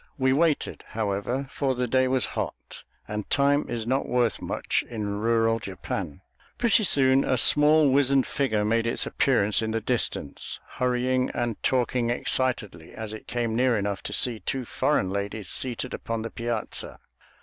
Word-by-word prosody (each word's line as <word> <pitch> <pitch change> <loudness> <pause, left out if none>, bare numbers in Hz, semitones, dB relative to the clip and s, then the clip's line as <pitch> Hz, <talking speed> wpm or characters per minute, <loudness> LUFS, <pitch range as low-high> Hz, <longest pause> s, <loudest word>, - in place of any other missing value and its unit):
We 130 -1 +2
waited, 155 +1 0
however, 110 +5 -2
for 135 -2 -1
the 125 0 -1
day 130 +2 +2
was 130 -1 +1
hot, - - -5 0.3
and 105 0 -5
time 145 +1 +2
is 115 -2 -3
not 130 +3 0
worth 120 -2 +1
much - - -1
in 105 -3 -3
rural 115 0 +2
Japan. 95 -4 -5 0.4
Pretty 230 -2 +3
soon 135 -4 +4
a 130 - +1
small, 150 +1 +5
wizened 140 -1 +4
figure 110 -7 0
made 115 +2 +1
its 115 - +1
appearance 105 -6 +2
in 110 - -2
the 115 +1 -1
distance, 115 - -1
hurrying 125 0 0
and 120 -3 -2
talking 125 -2 +1
excitedly 120 -9 -1
as 110 -1 -6
it 110 - -10
came 120 -2 -2
near 125 -1 +2
enough 100 -3 -2
to - - -6
see 120 -3 +3
two 130 +2 -3
foreign 130 -7 0
ladies 100 0 -4
seated 125 0 -3
upon 115 -1 -4
the 115 - -5
piazza. 115 -1 -4
120 Hz, 160 wpm, -26 LUFS, 110-130 Hz, 0.4 s, small